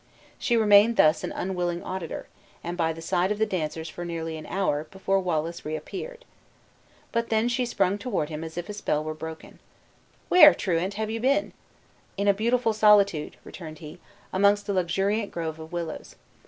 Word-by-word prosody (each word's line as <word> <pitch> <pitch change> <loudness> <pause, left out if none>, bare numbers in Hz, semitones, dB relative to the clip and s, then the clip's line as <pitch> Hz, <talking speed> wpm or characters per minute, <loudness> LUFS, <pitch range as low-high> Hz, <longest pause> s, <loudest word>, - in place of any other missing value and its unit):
She 240 - +1
remained 215 +1 +5
thus 155 +1 +4
an - - -3
unwilling 175 -2 -2
auditor, 185 -3 -5 0.4
and 175 +1 -4
by 165 -2 +1
the 165 0 -8
side 180 +3 +1
of 210 - -1
the 220 - +2
dancers 160 -4 -3
for 175 +2 -7
nearly 165 -1 -4
an 155 - -8
hour, 155 -6 -1
before 195 0 0
Wallace 170 -2 -2
reappeared. 385 - -6 0.9
But 230 0 -1
then 220 +1 +2
she 245 0 0
sprung 200 -3 0
toward 195 -11 -2
him 155 0 -5
as 160 +1 -8
if 175 - -4
a 210 - -5
spell 155 -7 -1
were 155 0 -4
broken. 160 +1 -9 0.7
"Where, 305 -5 +8
truant, 185 +1 -1
have 215 +1 -2
you 225 - -3
been?" 275 +5 +1 0.6
"In 200 +1 0
a 200 - +6
beautiful 230 +2 +1
solitude," 205 -7 +3
returned 155 -3 -9
he, 155 +3 -11 0.3
"amongst 200 +2 +3
a - - +1
luxuriant 195 +4 0
grove 160 -2 -5
of 160 0 -10
willows." 170 -2 -5
185 Hz, 180 wpm, -26 LUFS, 160-210 Hz, 0.9 s, Where